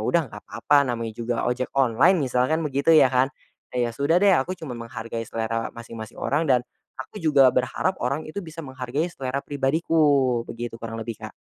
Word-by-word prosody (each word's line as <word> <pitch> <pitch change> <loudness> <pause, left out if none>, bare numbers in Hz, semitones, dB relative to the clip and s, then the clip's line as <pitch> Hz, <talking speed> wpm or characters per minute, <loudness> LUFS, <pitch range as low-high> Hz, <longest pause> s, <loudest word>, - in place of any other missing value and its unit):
udah 165 +10 +2
nggak 105 - -10
papa 145 +5 +2
namanya 115 -2 -3
juga 115 +1 -2
ojek 125 +1 -1
online 135 +8 +4
misalkan 130 +6 +1
begitu 140 +2 +2
ya 135 -4 +6
kan, 130 0 +3 0.5
ya 120 -1 +1
sudah 140 +8 +1
deh 200 - +6
aku 180 +8 -2
cuma 160 -8 -8
menghargai 115 0 -6
selera 115 +1 -2
masing-masing 115 -2 -9
orang 155 +4 0
dan, 125 -2 +4 0.4
aku 210 - -11
juga 140 -5 +5
berharap 125 +10 -1
orang 140 +5 -1
itu 155 - -6
bisa 165 0 -8
menghargai 130 +4 -3
selera 135 -2 -3
pribadiku 140 -3 +2
begitu 120 0 -6
kurang 115 0 -6
lebih 115 -1 -6
Kak. - - -7
130 Hz, 180 wpm, -24 LUFS, 115-150 Hz, 0.5 s, ya